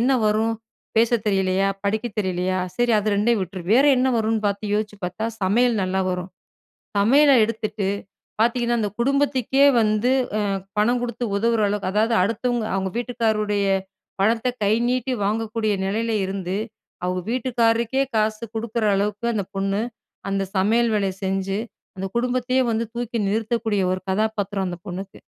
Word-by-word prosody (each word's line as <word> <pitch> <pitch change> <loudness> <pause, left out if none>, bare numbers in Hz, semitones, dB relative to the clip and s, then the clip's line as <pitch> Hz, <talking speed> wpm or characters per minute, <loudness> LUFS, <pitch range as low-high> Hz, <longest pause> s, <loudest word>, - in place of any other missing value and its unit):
என்ன 255 +3 +3
வரும்? 220 +2 +2 0.4
பேச 230 0 +4 0.2
தெரியலையா, 195 -1 +2 0.2
படிக்க 215 +3 0
தெரியலையா, 185 -1 -1 0.2
சரி 240 -1 +2
அது 210 +1 0
2யும் 220 +2 +2
விட்டுரு. 185 0 -6
வேற 265 +4 +5
என்ன 260 +1 +2
வரும்னு 220 0 0
பார்த்து 205 +1 -3
யோசிச்சு 210 -1 -2
பார்த்தா, 185 +5 -4 0.2
சமையல் 225 +3 +3
நல்லா 190 +1 0
வரும். 180 0 -4 0.7
சமையல 275 +8 +5
எடுத்துட்டு 215 -2 -3 0.6
பார்த்தீங்கன்னா 240 +1 +2
அந்த 210 -2 0
குடும்பத்துக்கே, 275 0 +2 0.2
வந்து 215 +3 +2 0.3
அ - - +1 0.4
பணம் 235 +4 +3
குடுத்து 245 0 -3
உதவுற 230 +2 +2
அளவுக்கு 200 -2 -1
அதாவது 220 +3 +2
அடுத்தவங்க 230 +3 0
அவங்க 190 0 -1
வீட்டுக்காரருடைய 220 -4 0 0.5
பணத்த 225 +5 +2 0.2
கை 200 - +3 0.2
நீட்டி 255 +1 0
வாங்கக்கூடிய 220 +1 0
நிலையில 225 +4 -1
இருந்து. 190 -1 -3 0.5
அவுங்க 180 0 -1
வீட்டுக்காரருக்கே 235 0 +1
காசு 215 0 0
குடுக்குற 225 0 -2
அளவுக்கு 210 +3 -1
அந்த 210 -3 -1
பொண்ணு, 195 +1 0 0.5
அந்த 195 0 0
சமையல் 225 +5 +3
வேலைய 195 -2 0
செஞ்சு, 195 0 -1 0.4
அந்த 190 +1 -3
குடும்பத்தயே 250 +1 +1
வந்து, 225 +1 0
தூக்கி 240 -1 -2
நிறுத்தக்கூடிய 220 -1 0
ஒரு 185 0 -2
கதாபாத்திரம், 205 -1 -1
அந்த 175 -1 -6
பொண்ணுக்கு. 190 +2 -7
215 Hz, 140 wpm, -23 LUFS, 195-235 Hz, 0.7 s, வேற